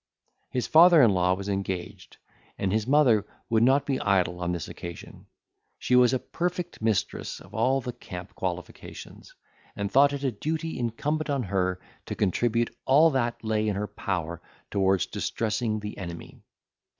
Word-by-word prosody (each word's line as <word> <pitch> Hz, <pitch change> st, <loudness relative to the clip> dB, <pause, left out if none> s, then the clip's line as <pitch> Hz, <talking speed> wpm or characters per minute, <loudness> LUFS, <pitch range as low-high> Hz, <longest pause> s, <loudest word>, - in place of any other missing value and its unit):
His 125 Hz, -, -2 dB
father 165 Hz, -1 st, +7 dB
in 115 Hz, -, +6 dB
law 90 Hz, -1 st, +2 dB
was 100 Hz, +1 st, -7 dB
engaged, 95 Hz, -3 st, -4 dB, 0.4 s
and 95 Hz, 0 st, -1 dB
his 110 Hz, +1 st, 0 dB
mother 130 Hz, -7 st, +4 dB, 0.3 s
would 110 Hz, -1 st, +3 dB
not 135 Hz, +4 st, +4 dB
be 135 Hz, -2 st, -1 dB
idle 90 Hz, -3 st, +1 dB
on 90 Hz, 0 st, -1 dB
this 85 Hz, -3 st, -4 dB
occasion. 85 Hz, 0 st, -9 dB, 0.5 s
She 125 Hz, -, +1 dB
was 125 Hz, -1 st, +6 dB
a 130 Hz, -, +2 dB
perfect 175 Hz, -, -4 dB
mistress 110 Hz, -2 st, -1 dB
of -, -, -16 dB
all 130 Hz, +5 st, +2 dB
the 125 Hz, -1 st, -5 dB
camp 90 Hz, -3 st, -9 dB
qualifications, 90 Hz, -1 st, -7 dB, 0.4 s
and 100 Hz, -1 st, -3 dB
thought 140 Hz, +1 st, +5 dB
it 140 Hz, -1 st, -4 dB
a 135 Hz, -, +1 dB
duty 160 Hz, +8 st, -3 dB
incumbent 150 Hz, +7 st, -2 dB
on 140 Hz, -3 st, 0 dB
her 95 Hz, -2 st, -1 dB, 0.3 s
to -, -, -4 dB
contribute 115 Hz, +4 st, 0 dB
all 155 Hz, +5 st, +6 dB
that 120 Hz, -4 st, -1 dB
lay 110 Hz, -1 st, 0 dB
in 105 Hz, -, 0 dB
her 105 Hz, +2 st, -2 dB
power 85 Hz, -5 st, -4 dB, 0.3 s
towards 95 Hz, -2 st, +2 dB
distressing 110 Hz, -1 st, -2 dB
the 105 Hz, 0 st, -6 dB
enemy. 85 Hz, -3 st, -8 dB
110 Hz, 160 wpm, -27 LUFS, 95-135 Hz, 0.5 s, father